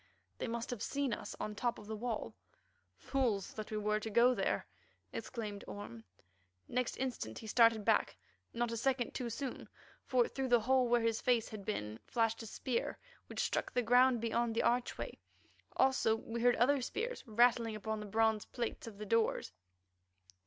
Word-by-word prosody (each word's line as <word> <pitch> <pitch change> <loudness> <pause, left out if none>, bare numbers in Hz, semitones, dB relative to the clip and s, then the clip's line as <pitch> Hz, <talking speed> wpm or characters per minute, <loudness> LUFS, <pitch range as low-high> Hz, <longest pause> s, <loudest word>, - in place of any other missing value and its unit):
They - - -2
must 235 +1 -3
have 245 - -4
seen 280 -3 -1
us - - -5
on 215 - -2
the - - -9
top 235 +3 -1
of 210 - -11
the 220 +1 -4
wall. 230 0 -3 0.6
"Fools 235 -8 0
that 215 -1 -6
we 215 - -2
were 210 0 +1
to 220 - -5
go 235 +4 +5
there!" - - 0 0.5
exclaimed 210 -5 -5
Orme. 115 - -8 0.6
Next 250 0 -1
instant 245 - -3
he - - -8
started 225 -1 +4
back, - - +2 0.3
not 235 0 -1
a 230 - -2
second 250 +1 +1
too 245 -2 -3
soon, 255 +3 -5 0.3
for 250 -2 +3
through 270 -1 -3
the 240 -2 +5
hole 255 +2 +3
where 240 0 +3
his 225 0 +1
face 240 -3 +2
had 215 -2 -7
been, 105 - -3
flashed 225 -1 +1
a 225 - -7
spear 240 +2 -2 0.3
which - - -3
struck - - -1
the 245 - +1
ground 245 +1 +5
beyond 230 0 0
the - - +2
archway. 245 +1 0 0.6
Also 260 -4 +4
we 230 +1 -5
heard 245 0 +5
other 270 +4 +3
spears 465 - -3
rattle 235 +1 +4
upon 220 0 -3
the 210 - -6
bronze 220 0 +2
plates 235 -1 -4
of 215 -3 -9
the 210 - -6
doors. 225 - +1
230 Hz, 180 wpm, -35 LUFS, 215-245 Hz, 0.6 s, go